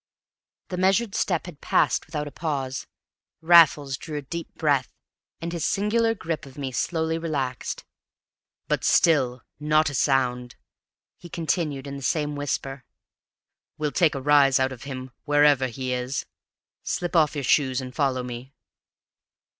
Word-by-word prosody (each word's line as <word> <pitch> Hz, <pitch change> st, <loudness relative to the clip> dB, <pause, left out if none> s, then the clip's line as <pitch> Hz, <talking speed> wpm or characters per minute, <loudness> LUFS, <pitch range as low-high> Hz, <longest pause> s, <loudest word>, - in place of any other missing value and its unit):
The 180 Hz, -, -4 dB
measured 195 Hz, +4 st, +2 dB
step 175 Hz, -4 st, 0 dB
had 165 Hz, -5 st, -11 dB
passed -, -, +1 dB
without 150 Hz, -2 st, -4 dB
a -, -, -8 dB
pause. 140 Hz, -4 st, -3 dB, 0.5 s
Raffles 155 Hz, -5 st, +5 dB
drew 155 Hz, +2 st, -6 dB
a 145 Hz, -, -5 dB
deep 170 Hz, +5 st, -6 dB
breath, 145 Hz, -5 st, +1 dB, 0.5 s
and 170 Hz, +1 st, -5 dB
his 170 Hz, -, -3 dB
singular 225 Hz, +3 st, +1 dB
grip 165 Hz, -7 st, -4 dB
of 135 Hz, -, -15 dB
me 135 Hz, -2 st, -4 dB
slowly 160 Hz, +5 st, -1 dB
relaxed. 140 Hz, -7 st, -3 dB, 0.8 s
"But -, -, 0 dB
still, 130 Hz, -7 st, +3 dB, 0.2 s
not 150 Hz, 0 st, +2 dB
a -, -, -9 dB
sound," 125 Hz, -3 st, 0 dB, 0.6 s
he 175 Hz, -, -11 dB
continued 155 Hz, -4 st, -2 dB
in 140 Hz, 0 st, -6 dB
the -, -, -8 dB
same 150 Hz, +1 st, -1 dB
whisper; 135 Hz, -2 st, -3 dB, 0.9 s
"we'll 150 Hz, -1 st, -1 dB
take 160 Hz, -3 st, +2 dB
a 135 Hz, -, -3 dB
rise 140 Hz, -2 st, +5 dB
out 130 Hz, 0 st, +1 dB
of 130 Hz, 0 st, -9 dB
him, 130 Hz, -2 st, -6 dB
wherever 145 Hz, -3 st, +4 dB
he 130 Hz, +1 st, -4 dB
is! 125 Hz, +2 st, -3 dB, 0.6 s
Slip 175 Hz, 0 st, -3 dB
off 155 Hz, -2 st, +4 dB
your 145 Hz, -, -3 dB
shoes 130 Hz, 0 st, +2 dB
and 130 Hz, -1 st, -7 dB
follow 130 Hz, -2 st, 0 dB
me." 125 Hz, +2 st, -8 dB
145 Hz, 150 wpm, -25 LUFS, 130-160 Hz, 0.9 s, Raffles